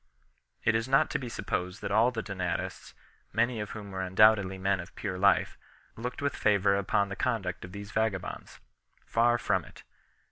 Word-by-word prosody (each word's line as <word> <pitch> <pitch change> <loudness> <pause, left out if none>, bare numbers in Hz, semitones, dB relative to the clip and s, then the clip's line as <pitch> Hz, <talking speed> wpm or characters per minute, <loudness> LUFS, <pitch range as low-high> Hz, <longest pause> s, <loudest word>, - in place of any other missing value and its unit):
It 110 - +3
is 115 +1 0
not 135 +1 +3
to - - 0
be 125 -3 -5
supposed 90 -3 -3
that - - -3
all 115 +3 +5
the 115 -3 -4
Donatists, 95 -4 -4 0.4
many 120 0 +1
of 105 -1 -4
whom 105 -2 -8
were 95 0 -3
undoubtedly 95 0 +4
men 95 0 +1
of 85 - -9
pure 95 -4 -4
life, 100 +1 +3 0.4
looked 125 +4 -5
with 140 - 0
favour 100 -1 +3
upon 100 +1 +1
the 100 - -4
conduct 100 -7 -2
of 90 - -9
these 100 +1 -8
vagabonds. 110 -4 -2 0.5
Far 120 +1 +3
from 95 -6 0
it. - - -15
100 Hz, 180 wpm, -29 LUFS, 95-115 Hz, 0.5 s, all